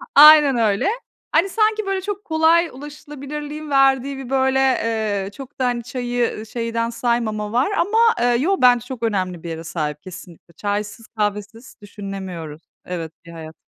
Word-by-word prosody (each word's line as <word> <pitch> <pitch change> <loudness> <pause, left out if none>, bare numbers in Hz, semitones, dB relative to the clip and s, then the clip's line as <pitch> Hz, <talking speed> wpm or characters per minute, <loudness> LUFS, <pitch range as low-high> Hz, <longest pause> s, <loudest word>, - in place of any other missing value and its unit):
Aynen 295 -3 +8
öyle. 210 -3 +1 0.5
Hani, 340 +5 +3
sanki, 435 0 +1
böyle, 390 -1 -1
çok 410 +1 -5
kolay 325 +1 +3
ulaşılabilirliğin 295 +1 -8
verdiği 270 0 +3
bir, 265 -2 -8
böyle, 265 0 +2
eee, 220 -6 0
çok 270 +2 -11
da, 255 - +1
hani, 240 -1 -1
çayı, 245 -1 -2
ııı, 215 - -8
şeyden 230 0 -2
saymama 230 -3 -1
var 255 - +1
ama, 405 +3 0 0.2
eee, 240 - +2 0.2
yo 385 +6 +1
bence 245 -2 +5
çok 250 -3 -7
önemli 185 -6 -2
bir 170 - -6
yere 165 0 -6
sahip 150 -2 -4
kesinlikle. 175 -2 -12
Çaysız, 205 +4 -4
kahvesiz 210 +2 -4
düşünemiyoruz 190 -6 -7 0.2
evet, 165 -3 -5
bir 170 - -11
hayat. 160 -1 -10
235 Hz, 160 wpm, -21 LUFS, 205-285 Hz, 0.5 s, Aynen